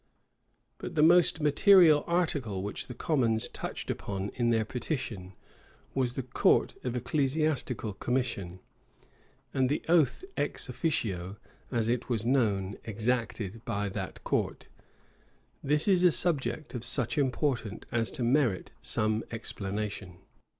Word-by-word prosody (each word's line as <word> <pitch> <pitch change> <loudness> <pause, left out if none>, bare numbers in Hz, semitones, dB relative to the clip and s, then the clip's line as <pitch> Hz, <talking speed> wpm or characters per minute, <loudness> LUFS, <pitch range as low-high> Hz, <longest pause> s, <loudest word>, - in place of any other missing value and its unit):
But - - -6
the 150 - +4
most 170 -1 +5
material 155 0 +6
article 145 - 0
which 100 - -5
the 125 - -8
commons 120 -7 +1
touched - - -5
upon 100 0 -4
in 120 -1 +1
their 110 -2 +2
petition, 115 - -4 0.6
was 125 -2 0
the 135 - -2
court 125 - +2
of 125 -1 -2
ecclesiastical 135 -3 0
commission, 100 -6 -2 0.9
and 130 -1 +2
the 145 - -1
oath 160 - +3
"ex - - -1
officio," 100 - -2 0.3
as 115 -3 0
it 120 +2 -1
was 115 -3 0
called, 105 -6 +1
exacted 115 -1 -2
by 100 0 -2
that - - -6
court. - - -1 1.0
This 150 +4 +2
is 185 -3 +4
a 180 - +7
subject 155 -2 -1
of 120 -3 -4
such 125 +2 0
importance 125 -5 -1
as 115 -1 0
to 125 - -1
merit 120 - +1
some 110 +1 +1
explanation. 105 -4 -5
120 Hz, 130 wpm, -29 LUFS, 105-145 Hz, 1.0 s, a